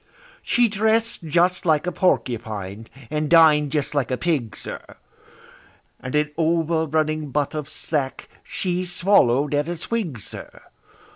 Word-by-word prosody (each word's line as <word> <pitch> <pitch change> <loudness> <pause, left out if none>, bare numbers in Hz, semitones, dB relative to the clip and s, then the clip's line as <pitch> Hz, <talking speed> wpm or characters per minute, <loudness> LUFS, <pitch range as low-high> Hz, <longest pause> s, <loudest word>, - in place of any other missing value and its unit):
She 240 0 +2
dress'd 220 +2 +1
just 175 +3 +2
like 155 -2 +2
a 180 - -1
porcupine, 110 - -1 0.2
and 150 -1 -1
din'd 155 -4 +5
just 150 -2 -1
like 140 -5 0
a 130 - -1
pig, 145 -10 -1
sir, - - -7 1.2
And 130 +3 -5
an 150 0 +1
over 165 0 +1
running 155 0 -1
butt 145 +1 -1
of 150 -1 -5
sack 145 -3 -3 0.2
she 180 -1 -2
swallow'd 150 -7 +2
at 145 +1 +1
a 175 - -3
swig, 170 - -3
sir! - - -10
155 Hz, 140 wpm, -22 LUFS, 140-175 Hz, 1.2 s, din'd